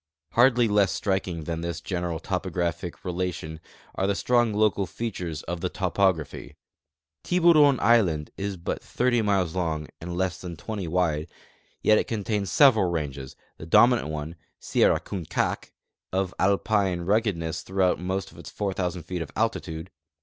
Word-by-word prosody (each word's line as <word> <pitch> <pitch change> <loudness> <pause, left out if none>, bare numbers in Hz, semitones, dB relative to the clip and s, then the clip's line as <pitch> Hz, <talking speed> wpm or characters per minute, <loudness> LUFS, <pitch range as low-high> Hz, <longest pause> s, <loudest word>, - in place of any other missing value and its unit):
Hardly 120 -1 +4
less 105 -2 +3
striking 95 -4 -2
than 80 +1 -4
this 85 -1 -3
general 90 -3 -3
topographic 90 -1 -3
relation 90 -3 -3 0.3
are 95 - -1
the 100 - +1
strong 120 +1 +2
local 105 -2 +1
features 90 -6 -5
of 85 0 -5
the 90 - -1
topography. 90 -5 -1 0.7
Tiburon 160 -6 +5
island 90 -11 +3
is 100 -1 -4
but 85 - -4
30 125 -1 +1
miles 95 -6 +1
long 80 -4 -2
and 85 +1 -5
less 95 -1 -1
than 85 -3 -7
20 100 0 -5
wide, 80 -2 0 0.6
yet 110 0 +5
it - - -2
contains 105 -3 -2
several 115 -10 +5
ranges, 70 -5 -4 0.2
the 80 - -9
dominant 120 +3 +5
one 75 +2 -5 0.2
(Sierra - - +2
Kunkaak) 90 -6 -3 0.4
of 95 -1 -1
Alpine 100 -2 +2
ruggedness 95 -4 0
throughout 95 -2 +1
most 95 +1 -3
of - - -15
its - - -9
4,000 95 -3 -3
feet 90 +1 -4
of 80 - -5
altitude. 95 -6 -2
95 Hz, 145 wpm, -26 LUFS, 85-105 Hz, 0.7 s, Tiburon